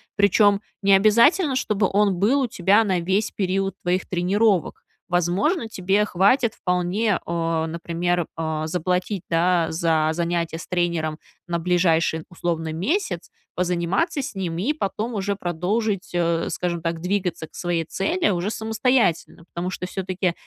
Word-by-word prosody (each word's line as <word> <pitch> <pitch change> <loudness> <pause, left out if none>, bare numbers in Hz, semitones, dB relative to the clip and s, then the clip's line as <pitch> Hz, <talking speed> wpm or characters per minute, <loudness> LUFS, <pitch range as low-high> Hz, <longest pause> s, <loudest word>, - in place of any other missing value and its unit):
Причем 200 0 +4 0.2
необязательно, 230 - +4
чтобы 215 -6 +1
он 200 -1 +3
был 245 +9 +3
у 260 - +1
тебя 205 0 +3
на 190 -4 0
весь 190 +5 0
период 195 0 -1
твоих 180 +1 -1
тренировок. 190 +1 +1 0.2
Возможно, 180 - +1
тебе 195 +1 +1
хватит 215 +5 +2
вполне, 180 +3 0
а, 165 -1 -1
например, 170 +1 -1
а, 160 -1 -2
заплатить, 180 +3 -1
да, 170 0 +2
за 160 -1 +1
занятие 170 -1 -1
с - - -9
тренером 170 -3 -1 0.3
на 170 -1 -1
ближайший, 165 -2 +1
условно, 165 -2 -3
месяц? 185 - -2 0.2
Позаниматься 180 - 0
с 275 - -6
ним 175 -4 -3
и 230 - 0
потом 225 -3 -3
уже 200 -1 -1
продолжить, 195 +4 -1
э, 170 -1 0
скажем 170 -2 -2
так, 165 0 -2
двигаться 180 -3 -2
к - - -40
своей 175 -2 -1
цели 330 - 0
уже 180 +2 -1
самостоятельно. 220 -6 0
Потому 175 +1 -3
что 185 - -5
всё-таки 185 -1 -2
180 Hz, 140 wpm, -23 LUFS, 170-205 Hz, 0.3 s, Причем